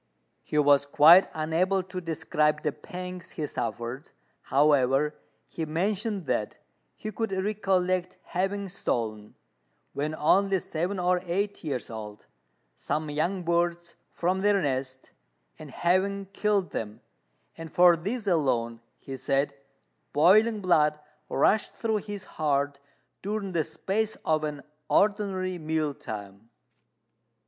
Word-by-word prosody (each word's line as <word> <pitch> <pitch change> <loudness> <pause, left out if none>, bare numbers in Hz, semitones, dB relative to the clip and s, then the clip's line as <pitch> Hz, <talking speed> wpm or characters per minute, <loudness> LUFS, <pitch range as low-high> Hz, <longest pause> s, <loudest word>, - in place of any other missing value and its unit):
He 150 - -4
was 145 -1 +4
quite 165 +6 +7
unable 175 +5 0
to 185 0 -6
describe 155 -2 0
the 150 - +1
pangs 180 +1 -8
he 155 - -3
suffered; 120 0 -4 0.3
however, 140 0 +3 0.3
he 165 - -5
mentioned 195 +4 -1
that 105 -5 -1 0.4
he 215 - -6
could 225 -1 -3
recollect 190 -2 0
having 195 +2 -2
stolen, 110 - -3 0.6
when 150 +2 -2
only 195 +6 +3
seven 180 +3 -3
or 180 0 +1
eight 200 +4 -2
years 135 -7 -4
old, 105 -1 -8 0.5
some 150 - -3
young 175 +5 -1
birds 170 0 0 0.2
from 185 +2 -1
their 205 0 +3
nest, 130 -4 -3 0.5
and 155 - -9
having 190 +6 +1
killed 205 -3 +1
them; 105 -1 -5 0.5
and 165 -1 -9
for 175 -1 +6
this 210 +7 -4
alone, 120 - 0 0.2
he 135 - -8
said, 135 +2 0 0.6
boiling 210 +8 +5
blood 150 -5 +3 0.3
rushed 215 - +2
through 220 -2 0
his 205 -1 -6
heart 140 -2 -1 0.4
during 205 -1 -3
the 165 -3 +1
space 215 +6 -2
of 155 -1 +2
an 150 -2 -4 0.3
ordinary 195 -3 +1
mealtime. 115 -10 -4
170 Hz, 120 wpm, -27 LUFS, 145-195 Hz, 0.6 s, quite